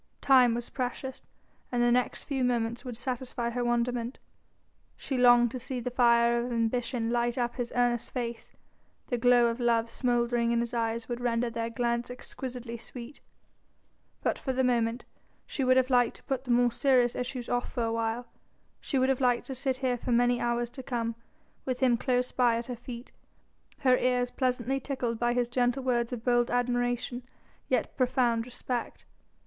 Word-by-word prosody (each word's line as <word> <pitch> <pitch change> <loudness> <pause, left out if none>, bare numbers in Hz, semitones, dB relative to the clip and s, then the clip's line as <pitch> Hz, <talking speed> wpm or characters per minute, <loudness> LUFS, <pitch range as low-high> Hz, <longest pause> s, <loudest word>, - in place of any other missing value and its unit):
Time 255 -4 +5
was 240 0 -5
precious, 260 +1 -4 0.5
and 240 -1 +1
the 240 - +4
next 250 0 +1
few 270 -3 -2
moments 235 -1 0
would 245 -3 -6
satisfy 245 -1 -3
her 245 +1 -2
wonderment. 240 +1 -1 0.8
She 270 - -4
longed 245 -2 +6
to 255 - -5
see 255 +1 -4
the 245 +1 -4
fire 235 -1 +4
of 245 - -4
ambition 230 0 -1
light 240 0 0
up 240 -1 -1
his 245 -2 -3
earnest 240 -1 +1
face: 235 -2 -5 0.6
the 245 - -1
glow 245 0 +5
of 235 +1 0
love 230 -1 +1
smouldering 240 -1 +1
in 235 - +2
his 235 0 -2
eyes 230 0 -1
would 240 -1 -3
render 235 0 0
their 230 0 -3
glance 235 0 -1
exquisitely 245 -1 -6
sweet. 245 +4 -9 1.0
But - - 0
for 265 - -2
the 260 +1 +1
moment 235 -1 +1 0.4
she 275 - -3
would 255 0 +4
have 260 0 +2
liked 245 -2 +3
to - - -15
put 265 -1 -3
the - - -11
more 240 0 +4
serious 245 -1 +3
issues 250 -1 -4
off 245 0 -1
for 245 - -1
a 225 0 0
while, 230 +1 -1 0.5
she 275 - -2
would 260 0 +3
have 265 0 +1
liked 245 -2 +2
to 270 - -5
sit 265 0 -1
here 250 -1 +1
for 245 - -3
many 245 +1 +3
hours 240 0 -1
to 260 - -7
come, 235 -3 -2 0.5
with 255 -1 -2
him 255 -3 +4
close 250 +1 0
by 245 -2 +3
at 235 - -4
her 250 - -5
feet, 240 +1 -9 0.7
her 255 -2 +5
ears 250 -1 +1
pleasantly 255 0 0
tickled 250 -4 -3
by 240 0 +2
his 245 -1 +1
gentle 245 +2 0
words 240 -2 0
of 235 -2 -5
bold 240 -1 +3
admiration 245 0 0 0.5
yet - - 0
profound 245 -3 +1
respect. 245 -1 -5
245 Hz, 185 wpm, -29 LUFS, 235-250 Hz, 1.0 s, longed